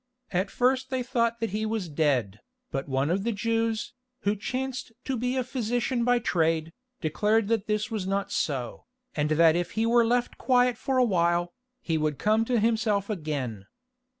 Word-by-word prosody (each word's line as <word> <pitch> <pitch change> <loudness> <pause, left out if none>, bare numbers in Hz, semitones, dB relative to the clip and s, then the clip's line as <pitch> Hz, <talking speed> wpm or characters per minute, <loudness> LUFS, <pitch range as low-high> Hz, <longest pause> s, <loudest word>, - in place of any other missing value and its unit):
At 185 +2 0
first 260 +1 +1
they 260 -1 -1
thought 235 -2 0
that 225 - -1
he 210 +2 -2
was 215 -4 -2
dead, 140 -10 0 0.3
but 135 +1 -3
one 135 +3 +1
of 195 +2 0
the 235 - 0
Jews, 225 +1 -1 0.3
who 205 +1 +1
chanced 255 +4 -4
to 265 - -1
be 250 +2 -1
a 255 - +1
physician 245 0 -1
by 245 +1 +4
trade, 165 -7 0 0.3
declared 210 +6 +1
that 225 -3 0
this 215 +1 -1
was 205 -4 -2
not 195 0 -1
so, 130 - -2 0.3
and 150 -1 0
that 160 +1 +5
if 175 0 -2
he 220 +1 +1
were 235 +1 +5
left 240 +1 0
quiet 250 -1 +3
for 265 +3 -1
a 255 - +5
while, 175 -3 +1 0.3
he 160 -2 0
would 150 -2 0
come 215 +2 +2
to 245 -1 +1
himself 220 -2 +1
again. 140 - -4
215 Hz, 180 wpm, -27 LUFS, 165-235 Hz, 0.3 s, that